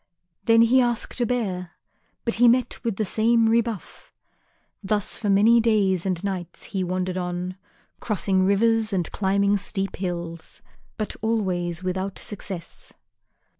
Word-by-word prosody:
Then 230 0 +6
he 255 +3 +5
asked 240 0 -1
a 240 - +2
bear, 190 -8 -2 0.5
but 230 - 0
he 245 - +8
met 245 +1 +2
with 230 -4 -1
the 215 - -1
same 225 +3 +3
rebuff. 230 -3 -1 0.7
Thus 205 0 -1
for 210 - -3
many 215 +4 +5
days 200 -5 +2
and 185 -1 -1
nights 185 -3 -4
he 190 -1 -3
wandered 185 0 -2
on, 180 +1 -3 0.4
crossing 195 -3 0
rivers 220 +3 +2
and 180 -3 -1
climbing 200 +1 +2
steep 195 0 -3
hills, 170 -3 -5 0.3
but 215 - -3
always 185 -6 -1
without 185 +1 -3
success. 190 -4 -6
200 Hz, 135 wpm, -24 LUFS, 185-225 Hz, 0.7 s, he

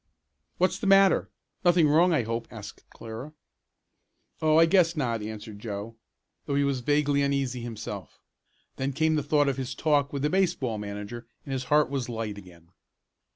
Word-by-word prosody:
"What's 185 - +1
the 210 - -2
matter; 195 -1 +5 0.3
nothing 175 -3 +5
wrong 165 +5 +4
I 150 -7 +2
hope?" 115 +1 -3
asked - - -11
Clara. 115 +7 -9 1.1
"Oh, 155 0 +4
I 165 - +7
guess 170 -1 +3
not," 120 -6 -1
answered 105 -1 -7
Joe, 105 +1 -6 0.5
though 140 - -1
he 140 - +3
was 140 -2 0
vaguely 145 +2 +1
uneasy 135 -3 -1
himself. 115 -2 -7 0.6
Then 135 +1 -2
came 160 +3 +2
the 155 - +1
thought 145 0 +2
of 135 -2 0
his 130 -1 -4
talk 145 -2 +1
with 140 -1 -3
the 150 - +2
baseball 150 - 0
manager 105 +3 -7 0.2
and 135 - -5
his 130 -1 -3
heart 150 -1 +3
was 130 -4 -2
light 110 -3 -4
again. 85 -3 -16
140 Hz, 170 wpm, -27 LUFS, 115-155 Hz, 1.1 s, I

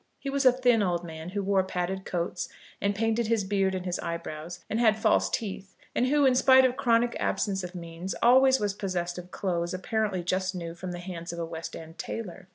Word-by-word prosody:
He 275 - -5
was 275 -1 +3
a - - +9
thin 245 -3 +3
old 175 -3 0
man, 160 0 -7
who 200 +1 -2
wore 195 0 +3
padded 190 +1 -3
coats, 175 -1 -2 0.3
and 200 0 +1
painted 225 +2 +1
his 225 -2 +2
beard 190 -1 +1
and 185 -1 -4
his 180 -1 -2
eyebrows, 170 0 -6
and 220 - -1
had 220 -3 +5
false 220 - +3
teeth, 200 -2 -4 0.2
and 250 - +2
who, 290 +1 +3
in 260 - +5
spite 260 +1 +6
of 255 -1 +1
chronic 235 -1 +2
absence 195 -2 0
of 180 +1 -7
means, 170 +2 -5
always 260 +2 +6
was 205 -1 0
possessed 180 -3 -3
of 180 0 -10
clothes 175 -2 -2
apparently 200 -1 -1
just 185 +1 -1
new 170 -2 -5
from 180 +1 -6
the 175 - -5
hands 175 -2 -6
of 170 - -7
a 170 - -2
West 165 0 -6
end 160 +1 -10
tailor. 185 -5 -6
190 Hz, 220 wpm, -28 LUFS, 175-225 Hz, 0.3 s, a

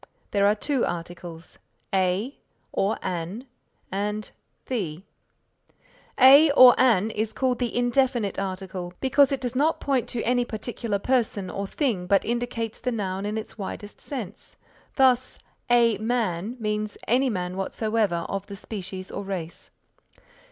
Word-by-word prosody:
There 200 -1 +3
are 210 - +4
two 270 +4 0
articles, 170 -1 -6 0.3
a 190 +7 +1 0.4
or 200 +3 0
an 180 +7 -4 0.5
and 210 +2 -2 0.3
the. 185 -9 -3 1.2
A 280 +4 +9
or 255 -3 +9
an 225 -4 +4
is 220 +1 -2
called 255 -2 0
the 245 -1 -1
indefinite 245 -4 +1
article 185 -2 -5
because 270 +1 +4
it 275 - 0
does 250 -1 -4
not 305 +5 +2
point 270 -4 0
put 235 - -2
any 245 +1 +2
particular 230 -2 -3
person 215 -4 0
or 200 0 -3
thing 210 - -1
but 195 +1 +3
indicates 235 -1 -2
the 250 - -1
noun 195 -3 -2
in 210 +1 -2
its 220 0 -7
widest 205 +1 -7
sense; 245 -10 -6 0.4
thus, 255 -2 +3 0.3
a 235 -3 +4
man 220 -2 -1
means 210 -1 -2
any 255 +3 +3
man 180 -4 -3
whatsoever 200 -2 -1
of 195 0 -4
the 200 - -7
species 190 -2 -7
or - - -4
race. 180 -4 -6
215 Hz, 140 wpm, -25 LUFS, 190-245 Hz, 1.2 s, A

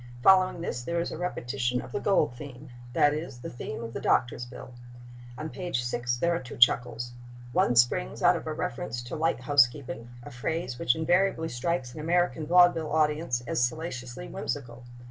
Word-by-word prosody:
Following 185 -2 +5
this 125 -7 -3
there 170 +7 -2
is 170 - -2
a - - -5
repetition 125 -7 -1
of 125 0 -8
the - - -2
gold 195 - +2
theme—that 125 0 -2
is, 150 -4 -5
the 120 - -7
theme 120 +1 -6
of 115 0 -7
the - - -4
doctor's 120 0 +1
bill. 125 0 -11 0.6
On 155 - -4
page 175 -6 -3
6 120 0 -1
there 170 +7 +1
are 170 - 0
two 125 -2 -9
chuckles. 120 0 +3 0.4
One 120 - +2
springs 115 - +2
out - - +6
of - - -5
a - - -2
reference 120 +2 -4
to 120 +6 -6
"light 160 -5 0
housekeeping," 125 -3 +2
a 145 - -9
phrase 125 0 -3
which 120 - +2
invariably 170 0 +1
strikes 125 +1 -2
an - - -8
American 165 -1 +1
vaudeville 175 -3 +5
audience 150 -4 +1
as - - -1
salaciously 125 - -3
whimsical. 120 - -5
130 Hz, 180 wpm, -28 LUFS, 120-160 Hz, 0.6 s, out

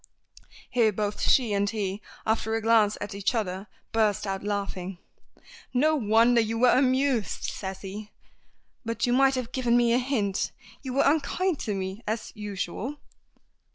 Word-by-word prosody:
Here 230 -3 +3
both 205 0 -3
she 240 -6 +3
and 200 0 +1
he, 205 -2 -3 0.2
after 220 0 0
a 225 - -1
glance 220 -2 +4
at 205 - -5
each 200 +5 -1
other, 195 -2 -2 0.2
burst 215 -3 +1
out 195 -1 -3
laughing. 195 -3 -3 0.8
"No 310 +5 +4
wonder 230 -1 +4
you 225 +1 -2
were 245 +1 +5
amused," 260 -3 +1
says 190 -1 -5
he, 205 +2 -7 0.7
"but 230 0 -1
you 245 - +1
might 270 +1 +4
have 250 -2 -3
given 245 -2 +2
me 235 -1 +3
a 245 - +4
hint. 230 -7 -1 0.3
You 260 -3 -5
were 275 - +3
unkind 315 +4 +1
to 210 - -2
me 190 +2 -4
as 220 +1 -3
usual." 210 +5 -4
225 Hz, 155 wpm, -27 LUFS, 205-250 Hz, 0.8 s, were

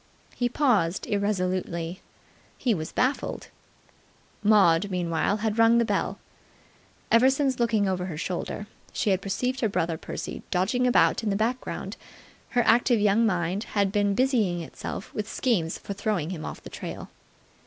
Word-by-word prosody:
He 245 -1 0
paused 215 - +1
irresolutely. 185 -4 -1 0.6
He 245 - +1
was 160 -5 -4
baffled. 260 +2 -1 0.9
Maud, 200 -3 +4
meanwhile, 180 +2 0
had 220 +1 -1
rung 230 +1 +6
the 235 - +3
bell. - - -1 0.9
Ever 240 +3 +6
since, 270 -1 0
looking 225 -4 +2
over 185 -1 -1
her 160 -5 -5
shoulder, 185 +5 -4 0.3
she 205 - +1
had 190 0 +1
perceived 250 +7 -2
her 225 - +1
brother 165 -4 -1
Percy - - -6
dodging 210 +8 +1
about 245 - +4
in 220 - -1
the 200 - +1
background, 235 +5 -2 0.6
her 240 - +5
active 235 0 +4
young 210 +2 +3
mind 180 +1 -1
had 200 -1 +3
been 205 -1 +1
busying 220 -9 +2
itself 165 - -7
with 210 0 -4
schemes 185 -11 0
for 200 - -6
throwing 195 -5 -1
him 160 -4 -5
off - - -7
the - - -9
trail. - - -7
205 Hz, 155 wpm, -26 LUFS, 180-235 Hz, 0.9 s, rung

